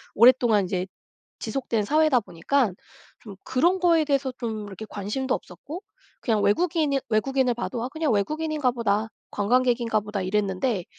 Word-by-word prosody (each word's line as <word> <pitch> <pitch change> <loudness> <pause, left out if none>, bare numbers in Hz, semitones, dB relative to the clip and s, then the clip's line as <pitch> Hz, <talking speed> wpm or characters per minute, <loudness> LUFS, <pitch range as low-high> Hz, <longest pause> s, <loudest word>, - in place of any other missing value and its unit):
오랫동안 235 -2 +6
인제 185 0 -2 0.5
지속된 225 -1 -1
사회다 305 +2 +3
보니깐 205 +4 0 0.5
좀 205 -4 -11
그런 340 +9 +2
거에 335 -3 +4
대해서 275 -2 0
좀 220 -3 -4
이렇게 205 +2 -8
관심도 215 +7 -2
없었고 210 - -9 0.4
그냥 220 -4 +1
외국인일 295 - +2
외국인을 255 +3 +2
봐도 240 0 -4
'아. 250 - -3
그냥 315 -1 -1
외국인인가 300 +5 0
보다. 220 -2 0 0.2
관광객인가 235 +1 +2
보다.' 210 -1 -4
이랬는데 195 +1 -1
240 Hz, 360 characters per minute, -25 LUFS, 205-275 Hz, 0.5 s, 오랫동안